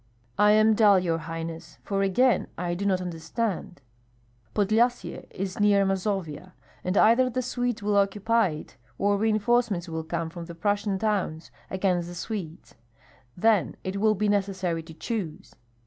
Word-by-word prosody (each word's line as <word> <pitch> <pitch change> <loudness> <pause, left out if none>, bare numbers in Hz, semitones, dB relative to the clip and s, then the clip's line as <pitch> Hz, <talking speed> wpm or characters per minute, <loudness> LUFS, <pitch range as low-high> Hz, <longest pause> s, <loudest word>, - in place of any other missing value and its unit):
"I 210 0 +6
am 215 +1 +5
dull, 210 -2 +6
your 170 -3 0
highness, 165 +1 -7
for 195 -1 -1
again 200 +3 +2
I 175 0 -2
do 200 +3 -2
not 185 -2 +1
understand." 180 - -4 0.7
"Podlyasye 225 +4 +1
is 190 +1 -5
near 205 -1 +4
Mazovia; 190 -4 -2 0.3
and 185 +2 -1
either 235 +4 +5
the 255 +1 -2
Swedes 245 -3 -2
will 205 0 +1
occupy 205 +2 +2
it 150 -3 -9 0.2
or 205 +1 +2
reinforcements 220 -3 +1
will 160 -1 -4
come 165 0 -3
from 170 -1 -7
the 170 0 -9
Prussian 205 +2 0
towns 190 -6 -2 0.2
against 185 -2 0
the 175 - -8
Swedes. 175 -4 -6 0.6
Then 215 0 +2
it 190 +1 -3
will 215 +1 +3
be 210 +2 0
necessary 190 -4 0
to 160 0 -12
choose." 185 -3 -5
195 Hz, 150 wpm, -26 LUFS, 175-215 Hz, 0.7 s, I